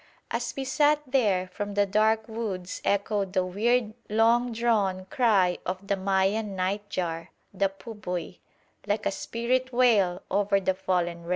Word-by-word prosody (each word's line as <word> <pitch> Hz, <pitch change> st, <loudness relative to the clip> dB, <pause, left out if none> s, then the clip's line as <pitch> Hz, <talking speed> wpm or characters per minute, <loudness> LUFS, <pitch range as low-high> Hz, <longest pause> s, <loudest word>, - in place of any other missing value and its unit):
As -, -, -2 dB
we 270 Hz, -, -1 dB
sat 295 Hz, +3 st, +3 dB
there, 210 Hz, -9 st, +1 dB
from 205 Hz, +1 st, -5 dB
the 205 Hz, 0 st, +3 dB
dark 215 Hz, +2 st, +2 dB
woods 210 Hz, -6 st, -4 dB
echoed 200 Hz, -1 st, 0 dB
the 185 Hz, -2 st, +2 dB
weird 220 Hz, +4 st, +1 dB, 0.2 s
long 230 Hz, +3 st, +3 dB
drawn 210 Hz, -5 st, 0 dB
cry 200 Hz, -8 st, +3 dB
of 185 Hz, +2 st, -4 dB
the 200 Hz, -, +1 dB
Mayan 195 Hz, +2 st, 0 dB
night 200 Hz, +3 st, -2 dB
jar 165 Hz, -3 st, -3 dB, 0.2 s
the 195 Hz, 0 st, +1 dB
pubuy 190 Hz, -4 st, -6 dB, 0.5 s
like 205 Hz, +1 st, -1 dB
a -, -, +2 dB
spirit 255 Hz, +5 st, -1 dB
wail 215 Hz, -8 st, +3 dB
over 200 Hz, 0 st, +2 dB
the 190 Hz, 0 st, +1 dB
fallen 180 Hz, -2 st, -1 dB
race. -, -, -9 dB
200 Hz, 155 wpm, -27 LUFS, 185-225 Hz, 0.5 s, sat